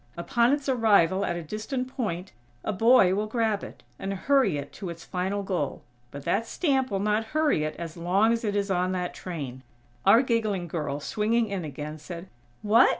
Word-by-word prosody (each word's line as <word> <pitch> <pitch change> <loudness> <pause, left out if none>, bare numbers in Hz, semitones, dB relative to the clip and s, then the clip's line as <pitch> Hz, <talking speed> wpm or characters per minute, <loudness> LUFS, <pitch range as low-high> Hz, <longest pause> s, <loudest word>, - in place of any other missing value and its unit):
Upon 235 +8 +2
its 285 -1 0
arrival 200 -7 +4
at 175 - -1
a 170 - -4
distant 220 - -3
point, 195 -8 -4 0.3
a 215 - -1
boy 225 -2 +5
will 210 +2 0
grab 220 -2 0
it, - - -10 0.2
and 195 0 -3
hurry 240 - +2
it 140 0 -6
to 190 - -6
its 170 -1 -8
final 190 +3 -2
goal. 180 -7 -2 0.3
But 140 +2 -9
that 225 +3 +1
stamp 270 -5 +1
will 195 -2 -1
not 210 +2 +1
hurry 300 - +3
it 155 - -4
as 165 -2 -6
long 190 +6 +3
as 230 - -2
it 205 -2 -1
is 200 -1 0
on 180 0 +1
that 180 -1 -2
train." 140 -8 -6 0.4
Our 235 +4 +6
giggling 215 -7 0
girl, 150 -4 -3
swinging 225 +7 +1
in 195 -3 -3
again, 150 +1 -6
said: 170 +4 -8 0.3
"What? 225 +4 +6
195 Hz, 195 wpm, -27 LUFS, 170-230 Hz, 0.4 s, Our